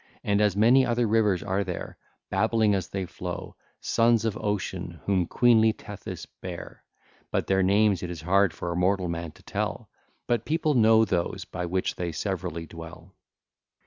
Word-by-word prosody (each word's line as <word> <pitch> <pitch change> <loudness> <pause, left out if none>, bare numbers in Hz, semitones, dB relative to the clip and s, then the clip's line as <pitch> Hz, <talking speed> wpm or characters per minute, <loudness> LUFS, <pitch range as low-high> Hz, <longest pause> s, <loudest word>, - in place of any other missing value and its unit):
And 100 0 +2
as 105 -3 +3
many 120 +5 +6
other 120 -1 +1
rivers 105 -4 +2
are 95 +1 0
there, 90 -2 -6 0.4
babbling 110 +1 +2
as 95 -3 -1
they 95 -1 -3
flow, 90 0 -6 0.3
sons 115 -1 +3
of 110 - 0
Ocean, 95 -5 -3
whom 95 -4 +1
queenly 110 -2 +4
Tethys 105 -2 -8 0.2
bare, - - -8 0.5
but - - -1
their 95 0 +2
names 100 0 +3
it 90 - -4
is 85 -3 -6
hard 95 +2 +3
for 85 - -5
a - - -3
mortal 90 +1 +1
man 85 -1 -4
to - - -20
tell, - - -4 0.3
but 120 -2 0
people 155 +1 +1
know 110 -2 +5
those 85 -5 -2
by 90 -1 -5
which 95 +2 -1
they 85 -1 -2
severally 90 -2 -3
dwell. 80 +2 -11
(ll. - - -46
95 Hz, 175 wpm, -26 LUFS, 90-110 Hz, 0.5 s, many